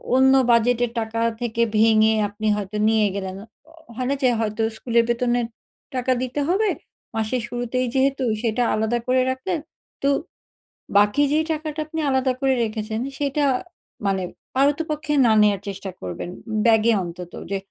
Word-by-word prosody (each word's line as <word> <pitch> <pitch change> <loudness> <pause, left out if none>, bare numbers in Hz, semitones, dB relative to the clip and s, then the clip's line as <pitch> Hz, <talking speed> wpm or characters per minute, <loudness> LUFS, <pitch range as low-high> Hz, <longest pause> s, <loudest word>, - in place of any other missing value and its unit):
অন্য 265 +1 +5 0.2
বাজেটের 240 0 +3
টাকা 225 0 -2 0.2
থেকে 235 -1 -1 0.2
ভেঙে 220 0 +5
আপনি 210 +2 -4
হয়তো 205 0 -4
নিয়ে 220 -1 +3
গেলেন। 190 -1 -4 0.6
হয় 250 +1 -2
না 280 - +1
যে 255 - +5
হয়তো 215 0 -1
স্কুলের 235 +1 +2
বেতনের 240 0 +1 0.5
টাকা 255 0 0
দিতে 255 +3 -3
হবে 400 +5 +2 0.5
মাসের 225 +3 -1
শুরুতেই 245 +1 -2
যেহেতু 270 0 +2 0.2
সেটা 235 +1 +1
আলাদা 220 +2 0
করে 255 0 +3
রাখলেন 265 +7 -2 0.4
তো 275 - +2 0.9
বাকি 205 +8 +4
যে 305 - +3
টাকাটা 310 0 -3
আপনি 320 +1 -5
আলাদা 265 -1 +2
করে 270 -1 +3
রেখেছেন 220 0 -3 0.2
সেটা 285 0 0 0.6
মানে 195 -1 +1 0.3
পারতপক্ষে 295 +2 +1
না 230 - +5
নেয়ার 205 -2 +3
চেষ্টা 195 -1 -5
করবেন। 90 - -5 0.4
ব্যাগে 225 0 +5
অন্তত 175 0 -8 0.2
যে 200 - +1
235 Hz, 145 wpm, -23 LUFS, 215-265 Hz, 0.9 s, অন্য